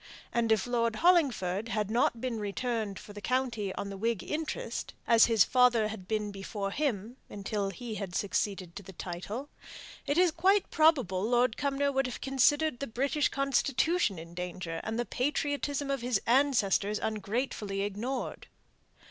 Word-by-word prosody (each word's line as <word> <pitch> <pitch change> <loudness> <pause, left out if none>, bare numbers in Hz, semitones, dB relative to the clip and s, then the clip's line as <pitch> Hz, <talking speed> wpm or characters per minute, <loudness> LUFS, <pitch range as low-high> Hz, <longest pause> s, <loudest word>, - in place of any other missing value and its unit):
And 235 -1 +1
if 220 -3 +3
Lord 230 -2 0
Hollingford 230 - +2
had 215 -2 -1
not 235 0 +2
been 240 -2 -3
returned 210 0 -2
for 205 - -11
the 205 - -8
county 235 -3 -1
on 200 - -4
the 195 - -6
Whig 225 -1 -1
interest 320 +11 -4
as 230 -1 +6
his 225 -5 +5
father 245 -3 +4
had 205 -4 -8
been 210 -1 -1
before 195 0 -4
him, 240 -3 -2
until 200 0 -3
he 225 +4 -6
had 195 -4 -5
succeeded 195 -3 -1
to 200 - -6
the 190 0 -12
title 190 - -6 0.6
it 285 - +1
is 360 -1 +5
quite 375 +5 +2
probable 265 - +3
Lord 240 +1 +2
Cumnor 280 0 0
would 270 -1 +1
have 250 - -6
considered 270 +1 +2
the 275 - -3
British 275 +6 0
constitution 275 - +1
in 165 +1 -9
danger, 180 -1 -5
and 220 +1 -3
the 240 - 0
patriotism 285 +1 -1
of 275 -3 -1
his 240 -4 +1
ancestors 230 -6 +3
ungratefully 215 -2 -2
ignored. 210 +7 -3
230 Hz, 160 wpm, -30 LUFS, 200-275 Hz, 0.6 s, as